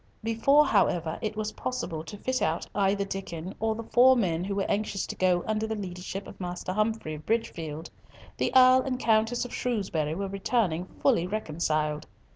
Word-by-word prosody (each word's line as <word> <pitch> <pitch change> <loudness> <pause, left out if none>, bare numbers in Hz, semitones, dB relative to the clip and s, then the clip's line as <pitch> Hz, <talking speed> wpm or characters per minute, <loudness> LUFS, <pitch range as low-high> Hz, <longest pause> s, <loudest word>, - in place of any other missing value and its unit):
Before, 230 +7 +4
however, 165 -2 +1
it 215 -1 -3
was 215 0 -2
possible 175 -11 -4
to 205 - -8
fit 255 +5 -2
out 160 +2 0
either 200 0 +1
Diccon 185 -2 -5
or 220 0 0
the 230 - -5
four 255 +3 +5
men 175 -6 0
who 200 +1 -3
were 195 - 0
anxious 205 -1 -1
to - - -6
go 180 -2 +2
under 220 0 -1
the 220 - -2
leadership 190 0 -6
of - - -12
Master 180 +1 -4
Humfrey 215 -5 -1
of 155 0 -9
Bridgefield, 165 -8 -2 0.5
the - - 0
Earl 255 0 +7
and 255 -1 -2
Countess 225 +2 +2
of 245 - -8
Shrewsbury 185 -10 -1
were 195 +2 -3
returning 195 -3 0 0.2
fully 230 -11 +3
reconciled. 155 -6 -1
200 Hz, 180 wpm, -28 LUFS, 170-225 Hz, 0.5 s, Earl